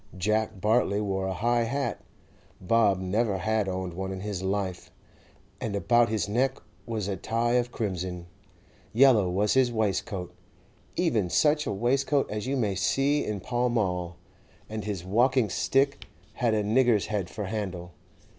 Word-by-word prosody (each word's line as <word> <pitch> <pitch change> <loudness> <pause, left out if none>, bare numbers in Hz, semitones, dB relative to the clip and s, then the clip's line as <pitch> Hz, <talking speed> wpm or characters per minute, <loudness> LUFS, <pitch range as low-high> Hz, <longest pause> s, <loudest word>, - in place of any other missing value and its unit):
Jack 110 +2 0
Bartley 105 0 +2
wore 95 -2 -1
a 95 - -1
high 120 +4 +1
hat—Bob 115 -4 -1
never 100 +2 0
had 105 +1 0
owned 95 -1 -3
one 95 +2 -4
in 95 -1 -5
his 100 -2 -4
life—and 95 +2 -6
about 120 +3 +3
his 110 -2 -1
neck 130 +5 +1 0.3
was 110 -4 -2
a 100 - -1
tie 115 +5 -1
of 120 0 +1
crimson; 90 -5 -3 0.7
yellow 115 -6 +5
was 100 +4 +1
his 130 -2 +3
waistcoat, 105 -4 -2 0.6
even 115 - +1
such 150 - +2
a - - 0
waistcoat 135 +6 +1
as 105 +3 -3
you 135 +1 0
may 105 -6 0
see 135 +10 +1
in 105 -2 -3
Pall 120 +5 0
Mall, 90 -7 -1 0.5
and 110 -1 -5
his 100 -4 -4
walking 120 +2 +2
stick 140 +6 +1 0.3
had 115 -3 +1
a 105 - +1
nigger's 115 0 +3
head 100 -4 -2
for 105 - -5
handle. 95 -4 -4
105 Hz, 150 wpm, -27 LUFS, 95-120 Hz, 0.7 s, yellow